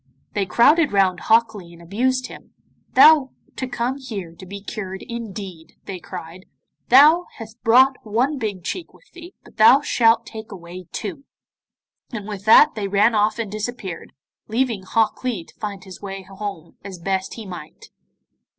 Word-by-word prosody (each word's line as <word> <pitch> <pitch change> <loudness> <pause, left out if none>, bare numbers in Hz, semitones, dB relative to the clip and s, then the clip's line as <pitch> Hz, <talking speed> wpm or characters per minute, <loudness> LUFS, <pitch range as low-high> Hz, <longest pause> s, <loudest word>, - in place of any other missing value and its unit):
They 200 -2 -1
crowded 295 - +4
round 190 -3 +2
Hok 225 0 +3
Lee 175 -5 -11
and 170 - -15
abused 250 +9 -1
him. - - -12 0.4
'Thou 300 -4 +7 0.3
to 260 - -4
come 245 +1 -2
here 200 -10 -7
to 185 +2 -13
be 200 +2 -7
cured, 195 -2 -7
indeed!' 200 -8 -8
they 190 -2 -6
cried, 180 0 -10 0.4
'thou 305 +7 +7
hast 225 -1 -11
brought 255 +3 +5
one 250 +7 0
big 205 -6 -4
cheek 345 - -6
with - - -24
thee, 350 +1 -12
but - - -19
thou 235 +6 +7
shalt 230 -5 +3
take 220 -1 -9
away 180 -1 -10
two.' 215 +6 -6 0.9
And 215 -4 -6
with 205 -2 -7
that 225 +7 +7
they 205 -2 -3
ran 205 +4 +3
off 210 +1 +2
and 225 -4 -4
disappeared, 210 -5 -6 0.3
leaving 230 -2 -1
Hok 220 +5 0
Lee 235 -9 -2
to - - -20
find 200 -3 -5
his 190 -2 -12
way 195 -1 -7
home 195 -3 -8
as 195 -2 -8
best 190 +2 -3
he 225 - -8
might. 175 -5 -10
210 Hz, 170 wpm, -21 LUFS, 190-240 Hz, 0.9 s, Thou